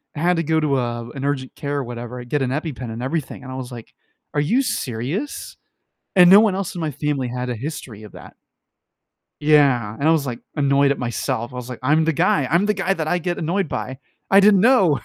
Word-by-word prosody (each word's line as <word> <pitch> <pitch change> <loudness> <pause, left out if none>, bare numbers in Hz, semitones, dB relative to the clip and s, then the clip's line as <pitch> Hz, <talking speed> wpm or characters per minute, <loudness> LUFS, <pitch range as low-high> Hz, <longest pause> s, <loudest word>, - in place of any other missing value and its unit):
I - - -5
had 175 +2 +2
to 165 - 0
go 160 +1 +1
to 145 -3 +1
a, 120 -2 -3
uh, 120 - -10
an 135 +2 -5
urgent 135 -2 -2
care 145 -1 -3
or 140 - -1
whatever. 120 0 -7
I 125 - -7
get 145 +4 -2
an 130 - 0
EpiPen 130 -4 -4
and 115 +2 -6
everything, 135 -2 -4
and 130 - -8
I - - -6
was 130 -1 -6
like, 120 -2 -10 0.4
"Are 145 - +1
you 225 - +2
serious?" 145 - -4 0.6
And 180 -1 +8
no 195 - +9
one 215 -3 +3
else 195 -2 -3
in 175 - -4
my 155 - -2
family 145 -2 -2
had 125 +1 -4
a 125 - -2
history 120 -4 -7
of 105 - -12
that. - - -13 1.0
Yeah, 135 -8 +3
and 140 - -5
I - - +6
was, 160 -3 +2
like, 120 -3 -4 0.2
annoyed 140 0 +3
at 140 - -2
myself. 120 0 -3
I - - -9
was 125 0 -6
like, 125 - -7
"I'm 155 +4 +3
the 165 - +2
guy, 140 0 +2
I'm 175 +5 +3
the 210 - +2
guy 195 0 0
that 160 -4 -3
I 180 - +1
get 175 0 -3
annoyed 170 +1 -1
by." 130 -1 -5 0.3
I 195 - +7
didn't 200 -1 +6
know. 195 - +4
140 Hz, 245 wpm, -21 LUFS, 125-165 Hz, 1.0 s, no